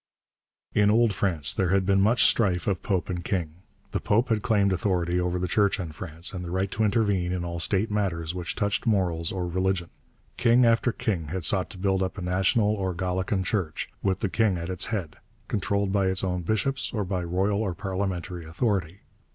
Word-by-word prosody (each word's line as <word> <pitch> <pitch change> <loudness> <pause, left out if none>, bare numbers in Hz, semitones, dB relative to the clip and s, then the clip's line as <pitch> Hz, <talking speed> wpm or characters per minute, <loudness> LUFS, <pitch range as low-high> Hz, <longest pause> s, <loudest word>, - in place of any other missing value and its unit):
In 105 0 +4
Old 115 0 +4
France 85 -8 +3
there 95 -2 0
had 95 0 +2
been 95 0 +3
much 110 +5 +4
strife 90 -7 +2
of 95 -3 -1
Pope 95 -5 -1
and 90 -2 -4
King. 85 -4 -2 0.3
The - - -1
Pope 115 +5 +1
had 110 -2 +1
claimed 100 -4 +2
authority 90 -1 0
over 90 0 0
the 90 0 -1
Church 100 +3 +2
in 85 -4 -4
France, 85 +1 -4
and 90 -1 -5
the 85 - -6
right 95 +2 -1
to 110 - 0
intervene 100 -4 +1
in 90 -1 -2
all 85 0 -4
state 100 +5 +1
matters 90 -6 -1
which 90 -1 -4
touched 105 +2 -1
morals 90 -6 +1
or 90 -2 -2
religion. 95 0 -1 0.5
King 120 +1 +4
after 115 +1 +3
king 90 -9 -2
had 90 +3 -4
sought 95 +1 +3
to - - -11
build 95 0 0
up 95 +2 -2
a - - -5
national 95 +4 +2
or 95 -4 -2
Gallican 95 +2 -1
Church, 95 -6 -2
with 95 -1 0
the 105 - +1
king 105 -2 +1
at 85 +2 -4
its 90 - +2
head, 95 -10 -4 0.3
controlled 100 -2 -1
by 100 -1 +2
its 95 0 0
own 90 -1 -1
bishops 110 +9 -1
or 105 -4 -2
by 90 -1 -2
royal 95 +4 0
or 95 -5 -2
parliamentary 95 -2 -3
authority. 90 +1 -2
95 Hz, 205 wpm, -26 LUFS, 90-105 Hz, 0.5 s, In